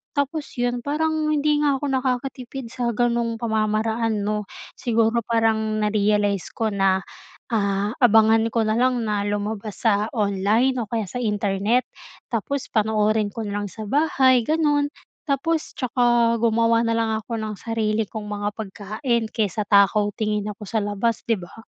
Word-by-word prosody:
Tapos 285 +1 -1
'yun, 245 0 0
parang 310 +3 -1
hindi 300 0 +2
nga 290 -2 +2
ako 275 +1 -2
nakakatipid 260 -1 -3
sa 240 -2 -2
ganong 235 0 +1
pamamaraan 220 -1 0
'no? 210 -1 -2 0.3
Siguro 230 0 +2
parang 220 -2 +1
na-realize 205 -2 +1
ko 220 -1 0
na 195 -1 +2 0.5
ah 200 -1 0
abangan 225 -1 +5
ko 225 -1 0
na 215 - +1
lang 245 -1 +1
na 210 -1 0
lumabas 205 +1 -4
sa 210 0 +3
online 215 +6 +2
o 215 - -6
kaya 225 -2 -1
sa 245 +7 -5
internet 210 +2 +1 0.5
tapos 260 +5 -2
panoorin 215 -1 +2
ko 220 +2 -6
na 205 0 -3
lang 205 - -3
sa 215 +2 -8
bahay, 265 -1 +3
ganun. 295 +1 +1 0.4
Tapos 315 +4 0
tsaka 240 -2 +2
gumawa 230 0 +3
na 230 -1 0
lang 225 -1 0
ako 230 +1 -5
ng 215 -1 -4
sarili 220 -1 -1
kong 215 -2 -6
mga 205 0 -3
pagkain 220 +4 -2
kaysa 210 -2 -1
takaw-tingin 210 +1 +2
ako 210 +1 -8
sa 220 +2 -1
labas, 205 +3 -1
'di 225 -3 +1
ba? 185 +5 -12
225 Hz, 150 wpm, -23 LUFS, 210-245 Hz, 0.5 s, abangan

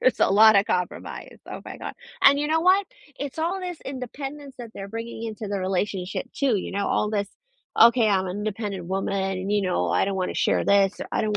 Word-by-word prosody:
There's 255 - +2
a - - +4
lotta 205 0 +7
compromise. 180 -1 -4
Oh - - -6
my - - -8
god, - - -6 0.3
and, 280 0 +7
you 295 - 0
know 320 +1 +2
what? 375 +3 +4 0.3
It's 280 +1 -5
all 345 +4 -1
this 360 -3 -5
independence 275 +2 -7
that 235 -2 -8
they're 195 0 -7
bringing 230 +1 -6
into 220 -1 -5
the 200 0 -2
relationship, 190 +2 -2
too, 270 -6 +1
you 190 - -4
know, 200 +1 -1
all 210 - +1
this, 205 -2 -1 0.5
"Okay. 235 0 +7
I'm 190 -2 +2
an 185 +2 -4
independent 205 -3 -4
woman, 195 +2 -2
and, 195 0 -2
you 210 - +3
know, 180 - 0
I 90 +2 +2
don't 195 -1 -2
wanna 185 -1 -1
share - - +1
this, 200 -1 +3
or - - -4
I - - +1
don't 210 -1 0
210 Hz, 220 wpm, -24 LUFS, 195-260 Hz, 0.5 s, lotta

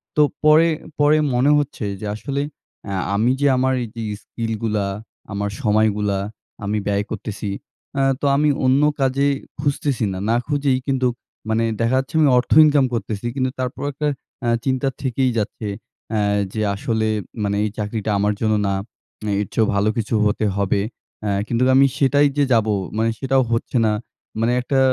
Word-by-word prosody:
তো 150 - +4 0.2
পরে 155 +2 +6 0.3
পরে 145 +1 +5 0.2
মনে 130 +4 +4
হচ্ছে 145 -6 -2 0.2
যে 105 - -4
আসলে 140 +5 -3 0.4
অ্যা 100 -2 -3 0.2
আমি 115 +5 +3
যে 145 - +4
আমার 130 +1 +2 0.2
যে 115 - -4 0.2
স্কিলগুলা, 110 -2 -2 0.5
আমার 100 +1 -2
সময়গুলা 105 -2 +2 0.4
আমি 105 +2 -1
ব্যয় 100 0 +1
করতেসি 105 -1 -4 0.4
অ্যা 135 - +1 0.2
তো - - -1
আমি 150 +1 +3 0.2
অন্য 130 +2 +4 0.2
কাজে 135 +1 +2 0.3
খুঁজতেছি 140 -3 0
না। - - -4
না 115 - +3
খুঁজেই 140 -3 +1
কিন্তুক 130 -3 +1 0.4
মানে 110 +1 +2 0.2
দেখা 115 +3 +2
যাচ্ছে 135 +4 -6
আমি 150 - +5
অর্থ 125 - 0
ইনকাম 145 -3 +4
করতেসি 110 -1 -3
কিন্তু 130 -1 0
তারপরও 130 +2 -3
একটা 150 +2 -2 0.3
অ্যা 120 - 0 0.2
চিন্তা 130 0 +1
থেকেই 130 -1 +1
যাচ্ছে 110 0 -3 0.4
অ্যা 110 -1 +1 0.3
যে 110 - -2
আসলে 110 +2 -1 0.4
মানে 100 0 0
এই 105 - 0
চাকরিটা 105 0 -2
আমার 105 +1 +2
জন্য 110 -1 +2
না, 100 - +1 0.7
এর 105 - -3
চেয়েও 110 -2 +2
ভালো 100 +2 +2
কিছু 115 0 -2
হতে 105 +1 +1
হবে। 100 0 +1 0.4
অ্যা 105 - 0 0.2
কিন্তুক 120 +2 +1
আমি 135 +1 +7
সেটাই 145 0 +4
যে 145 - +4
যাব, 110 -2 +3 0.3
মানে 115 +1 +2
সেটাও 135 0 +2
হচ্ছে 115 +2 0
না। 110 - +3 0.5
মানে 115 +2 +2
একটা 135 +2 0
120 Hz, 165 wpm, -21 LUFS, 105-135 Hz, 0.7 s, আমি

